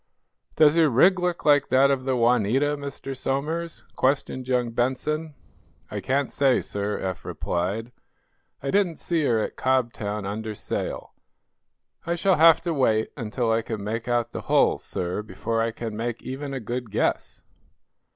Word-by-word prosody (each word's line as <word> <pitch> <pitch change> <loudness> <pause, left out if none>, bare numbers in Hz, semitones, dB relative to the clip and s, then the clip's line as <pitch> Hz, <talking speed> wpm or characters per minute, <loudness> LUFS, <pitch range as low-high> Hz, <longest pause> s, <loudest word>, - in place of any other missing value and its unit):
"Does 155 0 +5
her 160 -2 +5
rig 180 +10 +5
look 180 -1 -2
like 145 -2 +5
that 135 +2 +5
of 130 -2 -1
the 130 -1 +1
'Juanita,' 125 +4 +2
Mr. 140 -1 -6
Somers?" 155 +6 -3
questioned 130 -1 0
young 125 -2 +1
Benson. 145 +6 -1 0.6
"I - - -3
can't 140 +1 0
say, 135 -3 +3
sir," 105 0 -3
Eph 95 -2 -4
replied. 100 +7 -3 0.7
"I 135 - -1
didn't 190 -5 +2
see 165 -3 -1
her, 115 -4 +2
at 110 - -3
Cobtown, 115 -5 -1
under 110 +2 -4
sail. - - -4 0.9
I 170 +1 -1
shall 185 +1 +2
have 165 +1 +7
to 170 -1 -2
wait 110 -6 +1
until 115 -1 -1
I 115 +1 +2
can 110 -2 -5
make 115 +3 -3
out 120 -1 0
the - - -5
hull, - - +3
sir, 90 +3 -3
before 110 +3 -2
I 115 - +1
can 115 -1 -6
make 115 +1 -4
even 140 +2 -5
a 135 - -3
good 120 +1 -4
guess." - - -1
130 Hz, 160 wpm, -25 LUFS, 115-145 Hz, 0.9 s, have